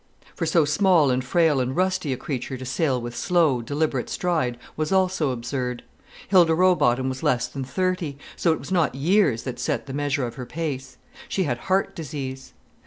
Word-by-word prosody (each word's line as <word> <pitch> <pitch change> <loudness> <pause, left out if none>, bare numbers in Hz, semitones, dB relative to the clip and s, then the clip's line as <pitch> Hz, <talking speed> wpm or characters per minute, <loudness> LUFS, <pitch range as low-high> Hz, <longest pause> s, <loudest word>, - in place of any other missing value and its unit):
For 165 - -2
so 165 -1 +4
small 160 -2 +4
and 125 0 0
frail 155 +1 +3
and 130 +1 -1
rusty 185 -4 0
a 130 - -1
creature 130 -1 -4
to 130 - -7
sail 130 0 0
with 120 0 -6
slow, 160 -8 +2
deliberate 145 0 -1
stride 155 -9 -1 0.2
was 155 +2 -2
also 185 -5 +2
absurd. 125 0 -3 0.4
Hilda 175 -4 +5
Rowbotham 145 -8 +3
was 130 0 -4
less 120 -2 +1
than 135 - -5
thirty, 170 +1 -2 0.2
so 170 - +2
it 160 - +1
was - - -9
not 170 -7 +2
years 145 - +2
that 125 -2 -5
set 125 - -1
the 135 - -7
measure 145 -2 0
of 120 - -5
her - - -5
pace; 145 -5 -4 0.3
she 190 - 0
had 125 -7 -2
heart 190 +1 +1
disease. 135 -5 -6
145 Hz, 185 wpm, -24 LUFS, 130-170 Hz, 0.4 s, Hilda